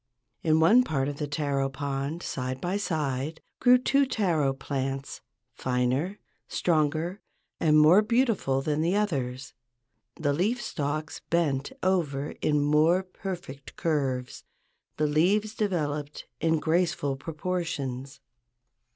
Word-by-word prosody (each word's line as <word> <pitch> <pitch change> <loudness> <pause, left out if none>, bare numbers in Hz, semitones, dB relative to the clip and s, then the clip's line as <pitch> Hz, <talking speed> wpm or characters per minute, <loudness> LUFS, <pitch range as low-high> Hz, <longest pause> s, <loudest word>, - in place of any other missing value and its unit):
In 160 -1 +3
one 210 +10 +6
part 140 - -1
of 145 -1 -4
the 150 - -2
taro 140 -2 -1
pond, 140 +4 -3
side 130 0 -3
by 175 +6 -2
side, 155 -6 -2 0.2
grew 250 0 +6
two 275 +2 +2
taro 170 - +1
plants—finer, 135 +2 -3 0.3
stronger, 165 +3 0 0.4
and 155 -2 +4
more 155 +7 +7
beautiful 215 - +1
than 150 +1 0
the 170 +4 +1
others. 135 -11 -2 0.6
The 145 -3 0
leaf 205 +11 +1
stalks 155 -7 -3
bent 145 -5 +1
over 150 -7 0
in 150 -1 +2
more 155 +5 +3
perfect 180 -7 -7
curves: 135 -6 -1 0.5
the 155 - +2
leaves 190 +9 +2
developed 150 -9 -2
in 160 0 +2
graceful 160 -4 +1
proportions. 145 -4 -4
155 Hz, 115 wpm, -27 LUFS, 140-180 Hz, 0.6 s, more